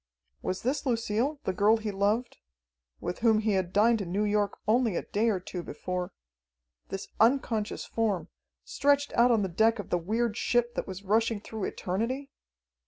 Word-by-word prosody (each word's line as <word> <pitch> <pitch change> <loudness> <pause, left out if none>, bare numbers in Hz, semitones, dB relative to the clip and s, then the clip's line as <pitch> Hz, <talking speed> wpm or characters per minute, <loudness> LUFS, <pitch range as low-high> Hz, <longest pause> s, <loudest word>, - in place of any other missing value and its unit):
Was 185 - -3
this 265 +5 0
Lucille, 240 +3 0
the 190 - -1
girl 210 +4 +4
he 215 -1 -3
loved... 205 +5 0 0.6
with 175 - -4
whom 225 -2 +4
he 215 0 +1
had 190 -3 0
dined 220 +2 +4
in 175 -3 -5
New 200 +3 +1
York 205 -1 +1
only 225 -2 +3
a - - -1
day 220 +3 +1
or 200 -4 +1
two 180 0 -6
before... 180 +1 -4 0.8
this 195 - -5
unconscious 230 -2 +1
form, 205 -8 -1 0.4
stretched 285 0 +1
out 240 +1 +5
on 225 -4 +3
the - - 0
deck 220 +6 +2
of 205 - -7
the 175 - +2
weird 220 +5 -1
ship 240 +1 +1
that - - -3
was 190 0 -7
rushing 225 +2 +1
through 215 0 -5
eternity? 245 +9 -3
215 Hz, 175 wpm, -29 LUFS, 195-235 Hz, 0.8 s, out